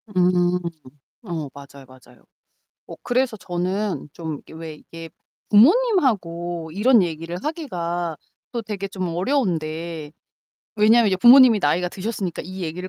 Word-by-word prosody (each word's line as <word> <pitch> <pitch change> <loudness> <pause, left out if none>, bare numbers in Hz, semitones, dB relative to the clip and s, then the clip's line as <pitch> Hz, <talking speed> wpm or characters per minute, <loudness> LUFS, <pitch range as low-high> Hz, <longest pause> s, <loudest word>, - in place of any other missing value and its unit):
음. 180 0 +2 0.6
어, 160 -7 -5
맞아요, 140 -1 -13
맞아요. 130 0 -19 0.6
어 - - -9
그래서 245 -2 0
저는 185 0 -3
좀 160 -4 -6
이게 - - -18
왜 160 -1 -8
이게 165 +2 -11 0.4
부모님하고 205 - +2
이런 225 +2 +4
얘기를 165 +1 -4
하기가 175 - -3 0.4
또 235 -1 -3
되게 200 -2 -5
좀 185 -3 -4
어려운데, 165 - -2 0.6
왜냐하면 220 +2 +5
이제 185 - +1
부모님이 240 +1 +7
나이가 175 +4 +1
드셨으니까 190 -3 -4
이 185 +1 -7
얘기를 180 +3 -5
180 Hz, 295 characters per minute, -22 LUFS, 165-215 Hz, 0.6 s, 부모님이